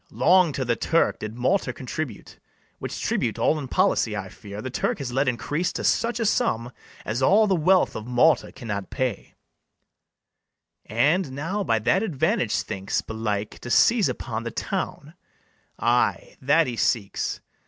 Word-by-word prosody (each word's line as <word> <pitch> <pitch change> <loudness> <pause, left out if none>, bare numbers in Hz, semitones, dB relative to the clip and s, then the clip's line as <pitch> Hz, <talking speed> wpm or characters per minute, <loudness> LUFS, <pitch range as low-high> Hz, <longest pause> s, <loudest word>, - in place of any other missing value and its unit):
Long 180 -3 +4
to 130 - -2
the 120 -1 +1
Turk 165 +7 +1
did 110 +1 -6
Malta 130 +4 +1
contribute; 130 +3 -6 0.4
Which - - -5
tribute - - -1
all 155 - +2
in 140 - -5
policy, - - +1
I - - -5
fear, 100 0 -10
The 130 +4 -5
Turk - - -1
has 135 -4 -5
let 135 +2 +1
increase 145 +7 -1
to - - -4
such 235 0 +1
a 225 - 0
sum 125 - 0 0.3
As 115 +5 -2
all 200 +11 +5
the 200 - +2
wealth 180 +3 +3
of 110 - -6
Malta 125 +6 +3
cannot 105 -6 -5
pay; 125 -6 -3 1.5
And 145 - +1
now 165 +9 -2
by 115 -11 +2
that 120 - +2
advantage 180 -12 0
thinks, 95 +1 -2
belike, 105 -2 -4
To 120 - -8
seize 230 - +4
upon 110 -1 -4
the 115 - -4
town; - - -4 0.6
ay, 120 +1 +1
that 150 +5 +4
he 120 -3 -4
seeks. 105 -5 -1
130 Hz, 160 wpm, -24 LUFS, 115-170 Hz, 1.5 s, all